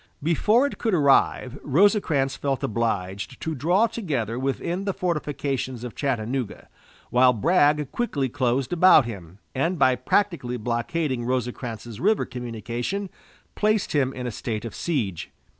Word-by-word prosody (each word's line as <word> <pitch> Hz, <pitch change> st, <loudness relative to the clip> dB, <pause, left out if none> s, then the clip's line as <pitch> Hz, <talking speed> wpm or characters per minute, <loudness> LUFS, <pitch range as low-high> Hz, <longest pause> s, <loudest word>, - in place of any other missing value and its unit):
Before 210 Hz, -, +3 dB
it 285 Hz, -, -4 dB
could 225 Hz, -5 st, +1 dB
arrive 140 Hz, -3 st, +2 dB
Rosecrans 150 Hz, -4 st, +2 dB
felt 135 Hz, -3 st, -2 dB
obliged 100 Hz, 0 st, -2 dB
to 160 Hz, -, -3 dB
draw 175 Hz, -, +2 dB
together 145 Hz, -, -3 dB
within 170 Hz, +8 st, -2 dB
the 195 Hz, -, -1 dB
fortifications 140 Hz, -7 st, -2 dB
of 125 Hz, -, -6 dB
Chattanooga, 125 Hz, -3 st, -3 dB, 0.4 s
while 125 Hz, +1 st, +5 dB
Bragg 150 Hz, -, +2 dB
quickly 145 Hz, -, -1 dB
closed 130 Hz, +1 st, 0 dB
about 175 Hz, -6 st, +6 dB
him, 95 Hz, -6 st, -8 dB, 0.2 s
and, 165 Hz, +7 st, 0 dB
by 130 Hz, -3 st, +4 dB
practically 130 Hz, -, 0 dB
blockading 120 Hz, +4 st, -2 dB
Rosecrans's 120 Hz, -2 st, -4 dB
river 210 Hz, +4 st, +2 dB
communication, 120 Hz, -, -4 dB, 0.4 s
placed 215 Hz, -1 st, +1 dB
him 135 Hz, -3 st, +2 dB
in 125 Hz, -1 st, -6 dB
a 120 Hz, -, -2 dB
state 110 Hz, 0 st, -4 dB
of 115 Hz, -, -6 dB
siege. 110 Hz, -, -2 dB
135 Hz, 135 wpm, -24 LUFS, 120-170 Hz, 0.4 s, about